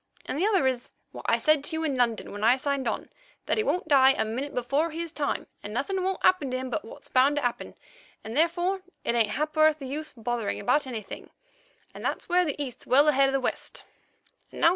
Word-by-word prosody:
And - - -3
the 385 - +3
other 390 -9 +3
is 255 -2 -1 0.2
what - - -9
I - - +4
said 310 -2 +3
to 320 +2 -2
you 320 - -2
in 300 -3 0
London 240 -3 0
when 205 +1 -6
I 235 +3 +6
signed 270 -1 -1
on, - - -3 0.4
that - - 0
he - - +2
won't 365 -5 -1
die 270 -2 +6
a 220 - -1
minute 255 +6 -3
before 275 +7 0
his 330 +1 -5
time, 290 -2 -2 0.2
and 205 - -7
nothing 375 +9 -1
won't 380 0 -2
happen 335 -8 +3
to 255 - -1
him, 255 0 -5
but 310 - -2
what's 225 - -12
bound 265 +3 +3
to 290 - -1
happen, 245 -1 -3 0.5
and 220 +2 -6
therefore 345 +5 +1 0.2
it - - 0
ain't 230 -3 +2
a - - -5
ha'porth 310 +1 +2
of 270 - -6
use 305 +4 -4
bothering 230 -3 -3
about 275 +3 +1
anything, 225 -5 -7 0.6
and - - -10
that's - - -2
where 360 0 +3
the 295 -2 -3
East's 260 -4 -6
well 285 +4 +5
ahead 275 -1 +4
of - - -3
the 270 - +2
West. 255 - -3
275 Hz, 230 wpm, -27 LUFS, 250-315 Hz, 0.6 s, I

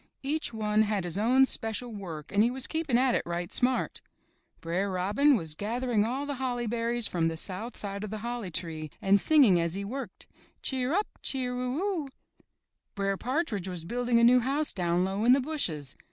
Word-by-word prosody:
Each 300 +1 -1
one 215 -1 +1
had 210 -3 0
his 175 +2 -2
own 255 +5 +5
special 230 -1 -4
work 165 -7 -7
and 205 - +3
he 230 - +4
was 260 +1 -2
keeping 315 -7 0
at 255 0 +3
it - - +2
right 175 0 -4
smart. 255 +1 0 0.6
Br'er 180 +4 -1
Robin 205 +10 +3
was 160 -5 -4
gathering 225 +4 0
all 260 +5 -2
the 285 -2 -4
holly 245 -2 -1
berries 235 +1 0
from 170 -2 0
the 165 0 -1
south 205 +8 -4
side 200 0 -4
of 215 - -4
the 215 - -4
holly 240 -5 -3
tree 160 -2 -4
and 195 +1 +4
singing 265 - +5
as 170 +1 -1
he 200 0 -4
worked: 245 -2 -6 0.4
''Cheer 260 0 0
up, 410 +6 +2 0.2
cheer 250 -2 0
u 250 +1 -2
u!'' 350 -4 -2 0.9
Br'er 195 -1 0
Partridge 245 - -2
was 180 -3 -5
building 240 +4 +1
a - - +3
new 250 +2 +7
house 280 +5 +1
down 175 -1 +1
low 195 +3 -2
in 245 +2 +6
the 270 - +4
bushes. 180 - -1
225 Hz, 195 wpm, -29 LUFS, 190-255 Hz, 0.9 s, new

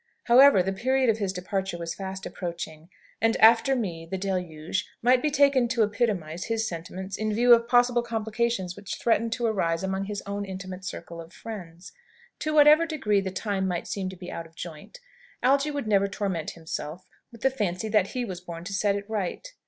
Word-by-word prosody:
However, 250 -4 +7
the 195 +1 -1
period 260 +4 +2
of 220 - -4
his 200 -3 -1
departure 190 0 -3
was 170 -1 -4
fast 190 0 -6
approaching, 170 -2 -6 0.3
and, 225 0 +3
"after 230 +4 +6
me, 180 -9 -3
the 190 - -3
deluge," 180 -3 -3
might 250 +1 +5
be 305 - +1
taken 280 -3 +4
to 230 -1 +2
epitomise 205 -6 -1
his 225 -1 -1
sentiments 185 +3 -6
in 215 0 -1
view 240 +3 +6
of 235 0 +4
possible 245 0 +4
complications 225 -4 -2
which 200 -1 -6
threatened 230 -1 +1
to 240 0 -2
arise 175 -6 0
among 190 +1 -1
his 205 0 -5
own 200 0 -3
intimate 190 -1 -7
circle 170 -2 -7
of 165 +1 -13
friends. 180 -6 -9 0.5
To 310 - -2
whatever 305 +2 +6
degree 220 -11 +1
the 190 - -3
time 190 0 -2
might 175 -2 -2
seem 195 -4 -3
to 185 - -8
be 180 0 -8
out 165 0 -6
of 165 - -26
joint, 170 - -9 0.4
Algy 275 +3 +3
would 285 -4 -3
never 200 -2 +3
torment 190 -4 -3
himself 160 +1 -6 0.3
with 230 -2 -14
the 265 - +3
fancy 210 -4 -2
that 210 -3 +3
he 250 +2 -3
was 185 -4 -6
born 170 -2 -8
to 200 +3 -6
set 200 +1 +1
it 200 0 -5
right. 215 - -3
200 Hz, 200 wpm, -26 LUFS, 180-235 Hz, 0.5 s, However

